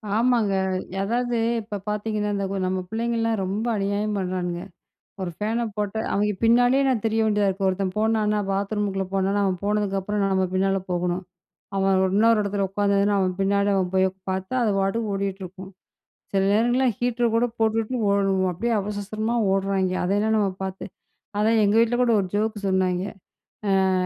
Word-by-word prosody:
ஆமாங்க. 230 Hz, -3 st, +2 dB, 0.5 s
அதாவது 240 Hz, +3 st, 0 dB, 0.2 s
இப்ப 210 Hz, -1 st, -6 dB
பார்த்தீங்கன்னா, 210 Hz, 0 st, -2 dB
இந்த 200 Hz, 0 st, -1 dB, 0.2 s
நம்ம 185 Hz, 0 st, -1 dB
பிள்ளைங்கலாம் 225 Hz, -1 st, -1 dB
ரொம்ப 200 Hz, +4 st, -2 dB
அநியாயம் 205 Hz, +1 st, -1 dB
பண்றானுங்க. 180 Hz, -2 st, -2 dB, 0.6 s
ஒரு 180 Hz, -2 st, -3 dB
ஃபேனை 225 Hz, +3 st, -1 dB
போட்ட 205 Hz, 0 st, -2 dB, 0.2 s
அவங்க 210 Hz, +1 st, +1 dB
பின்னாடியே 245 Hz, +4 st, +4 dB
நான் 255 Hz, -5 st, +1 dB
திரிய 225 Hz, 0 st, +1 dB
வேண்டியதா 210 Hz, -2 st, +2 dB
இருக்குது. 195 Hz, 0 st, -1 dB
ஒருத்தன் 185 Hz, 0 st, -2 dB
போனானா 215 Hz, -1 st, +1 dB
பாத்ரூமுக்குள்ள 200 Hz, 0 st, -1 dB
போனானா 195 Hz, +1 st, +1 dB
அவன் 185 Hz, -1 st, 0 dB
போனதுக்கு 205 Hz, -1 st, 0 dB
அப்புறம் 205 Hz, +2 st, -2 dB
நம்ம 190 Hz, -1 st, +1 dB
பின்னால 195 Hz, +1 st, +2 dB
போகணும். 175 Hz, +1 st, -1 dB, 0.5 s
அவன் 195 Hz, 0 st, +2 dB, 0.2 s
இன்னொரு 225 Hz, +1 st, +5 dB
இடத்துல 200 Hz, 0 st, -1 dB
உட்காந்துதுனா 200 Hz, 0 st, +2 dB
அவன் 185 Hz, -1 st, 0 dB
பின்னால 200 Hz, +1 st, +2 dB
அவன் 185 Hz, -2 st, 0 dB
போய் 190 Hz, 0 st, +4 dB, 0.2 s
பார்த்தா 190 Hz, +5 st, -3 dB
அது 220 Hz, -3 st, +2 dB
பாட்டுக்கு 205 Hz, +3 st, 0 dB
ஓடிகிட்டிருக்கும். 190 Hz, -1 st, -5 dB, 0.6 s
சில 195 Hz, -1 st, +2 dB
நேரங்கள்ல 240 Hz, +5 st, +3 dB
ஹீட்டர் 240 Hz, -1 st, 0 dB
கூட 235 Hz, +1 st, +3 dB
போட்டுட்டு 225 Hz, +2 st, 0 dB, 0.2 s
ஓட 200 Hz, 0 st, +3 dB, 0.3 s
அப்டியே 230 Hz, +7 st, -1 dB
அவசர 205 Hz, +1 st, -4 dB
அவசரமா 215 Hz, +3 st, -2 dB, 0.2 s
ஓடுறாய்ங்கெ. 195 Hz, -1 st, 0 dB
அதெல்லாம் 205 Hz, +4 st, +1 dB
நம்ம 205 Hz, -2 st, +2 dB, 0.2 s
பார்த்து. 190 Hz, 0 st, -5 dB, 0.5 s
அதான் 220 Hz, +1 st, +3 dB
எங்க 205 Hz, +1 st, +2 dB
வீட்ல 235 Hz, +1 st, +2 dB
கூட 245 Hz, -2 st, +3 dB
ஒரு 190 Hz, -, -2 dB
ஜோக்கு 215 Hz, +1 st, 0 dB
சொன்னாய்ங்க. 185 Hz, 0 st, +1 dB, 0.8 s
அ -, -, +1 dB
205 Hz, 155 wpm, -24 LUFS, 195-220 Hz, 0.8 s, இன்னொரு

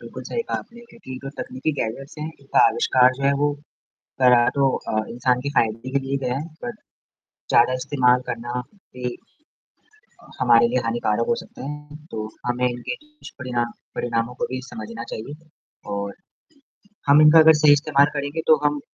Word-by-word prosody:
बिल्कुल -, -, -9 dB
सही 470 Hz, -, -2 dB
कहा -, -, 0 dB
आपने, 235 Hz, +1 st, -12 dB
क्योंकि 225 Hz, -, -10 dB
जो 135 Hz, -, -6 dB
तकनीकी 130 Hz, +5 st, -3 dB
गैजेट्स 135 Hz, +6 st, -4 dB
हैं, 150 Hz, -, -4 dB
इनका 140 Hz, -, +1 dB
आविष्कार 125 Hz, +2 st, +3 dB
जो -, -, -6 dB
है 140 Hz, -, +4 dB
वो 145 Hz, 0 st, +2 dB, 0.7 s
करा 125 Hz, -1 st, +6 dB
तो 140 Hz, -1 st, +3 dB, 0.2 s
अ, 110 Hz, 0 st, 0 dB
इंसान 125 Hz, +1 st, +1 dB
के 140 Hz, -, -3 dB
फ़ायदे 115 Hz, +3 st, -1 dB
के 140 Hz, -, +1 dB
लिए 135 Hz, +1 st, -1 dB
गया 125 Hz, 0 st, 0 dB
है। 150 Hz, -, -5 dB, 0.2 s
बट 240 Hz, -1 st, -4 dB, 0.8 s
ज़्यादा 120 Hz, +2 st, +5 dB
इस्तेमाल 125 Hz, -2 st, +3 dB
करना 120 Hz, +1 st, -3 dB, 0.3 s
भी 125 Hz, -1 st, -4 dB, 1.3 s
हमारे 120 Hz, -1 st, +5 dB
लिए 125 Hz, +2 st, +1 dB
हानिकारक 115 Hz, -1 st, 0 dB
हो -, -, +3 dB
सकता -, -, -11 dB
है। 150 Hz, +1 st, -8 dB
तो 110 Hz, -1 st, -4 dB, 0.2 s
हमें 125 Hz, +1 st, +1 dB
इनके 120 Hz, -, -4 dB
दुष्परिणाम 130 Hz, -, -5 dB, 0.2 s
परिणामों 115 Hz, 0 st, -2 dB
को -, -, +2 dB
भी 130 Hz, 0 st, -3 dB
समझना 115 Hz, +1 st, -7 dB
चाहिए 150 Hz, +8 st, -9 dB, 0.5 s
और 100 Hz, 0 st, -4 dB, 0.9 s
हम 145 Hz, +2 st, +7 dB
इनका 155 Hz, +1 st, +8 dB
अगर 160 Hz, 0 st, +8 dB
सही 145 Hz, -1 st, +8 dB
इस्तेमाल 145 Hz, -1 st, +3 dB
करेंगे, 145 Hz, +3 st, -2 dB
तो 155 Hz, -, +8 dB
हम 145 Hz, 0 st, +1 dB
130 Hz, 170 wpm, -23 LUFS, 120-145 Hz, 1.3 s, इनका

